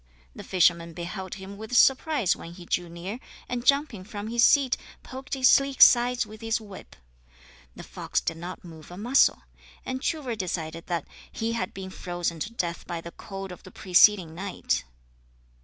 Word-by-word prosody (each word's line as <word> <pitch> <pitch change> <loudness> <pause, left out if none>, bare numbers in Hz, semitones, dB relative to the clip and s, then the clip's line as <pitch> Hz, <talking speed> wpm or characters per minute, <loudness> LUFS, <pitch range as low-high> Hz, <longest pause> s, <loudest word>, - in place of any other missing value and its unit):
The - - -8
fisherman 170 -2 +2
beheld 180 +2 -6
him 195 +1 -9
with 220 +3 -2
surprise 270 - +4
when 170 - -10
he 175 0 -12
drew 175 0 -1
near, 180 +7 -6 0.3
and 245 -1 -3
jumping 280 -8 +2
from 210 +1 -7
his 235 0 +2
seat 275 -2 +5 0.3
poked 265 +2 -6
his 260 -1 +4
sleek 275 0 +4
sides 245 0 +6
with 215 0 -12
his 225 0 0
whip. 205 -4 -12 0.8
The - - -9
fox - - -2
did 165 - -3
not 175 +2 -8
move 160 -2 -12
a 175 - -10
muscle, 245 +7 +3 0.4
and 260 0 -4
Truvor 280 -8 -2
decided 165 -4 -4
that 170 -4 -2 0.3
he 225 +1 -2
had 190 -5 -2
been 190 -1 -8
frozen 175 -2 -4
to 210 - -4
death 175 -7 -4
by 170 -2 -4
the 170 +1 -9
cold 195 -1 -8
of 180 - -10
the - - -13
preceding 185 -2 +4
night. 190 - -2
195 Hz, 175 wpm, -26 LUFS, 175-240 Hz, 0.8 s, sides